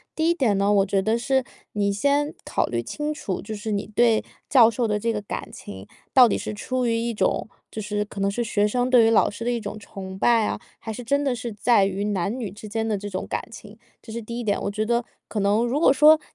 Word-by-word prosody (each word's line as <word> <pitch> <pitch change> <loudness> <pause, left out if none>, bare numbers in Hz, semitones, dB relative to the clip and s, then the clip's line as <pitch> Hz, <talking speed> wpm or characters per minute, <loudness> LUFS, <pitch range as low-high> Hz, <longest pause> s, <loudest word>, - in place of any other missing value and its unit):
第 320 0 +1
一 - - +4
点 245 - +1
呢， 200 +1 +2
我 195 -1 +4
觉 195 0 +1
得 220 +4 +1
是 265 +2 +1 0.3
你 200 -1 +1
先 285 +7 +1
考 - - 0
虑 120 -1 -2
清 300 - -3
楚， 200 - -4
就 215 - -6
是 215 +1 -5
你 200 -1 -1
对 230 -2 +4 0.3
教 240 -5 +7
授 230 0 -1
的 210 0 0
这 230 +2 0
个 210 - -3
感 205 - -6
情 95 -1 -10 0.3
到 255 -2 +8
底 - - 0
是 - - -4
出 255 +4 -2
于 230 -1 +1
一 235 +1 -1
种， 200 0 0 0.2
就 215 - -6
是 210 0 -2
可 205 - -9
能 195 0 +1
是 235 +4 -1
学 210 -2 +1
生 245 +3 0
对 245 -3 +6
于 - - +4
老 225 - +4
师 230 +3 -7
的 245 - +1
一 240 - -1
种 210 -1 -6
崇 190 -2 -8
拜 230 -1 +4
啊， - - -2 0.2
还 220 - -6
是 245 +3 -6
真 280 +4 +1
的 275 -3 +1
是 235 -1 -5
在 205 -1 +3
于 195 +1 -2
男 205 +3 -1
女 215 -6 -4
之 210 +2 -10
间 225 +1 -2
的 215 -2 0
这 205 +1 -6
种 185 -1 -4
感 - - -2
情， 210 -1 -12 0.2
这 225 - -11
是 235 - -4
第 235 +2 -6
一 240 - -3
点。 205 -2 0
我 - - -1
觉 215 +2 -2
得 235 +1 +1 0.3
可 215 - -2
能， 205 +3 +2
如 250 +5 0
果 290 -4 +5
说 305 +3 +7
220 Hz, 285 characters per minute, -24 LUFS, 205-240 Hz, 0.3 s, 到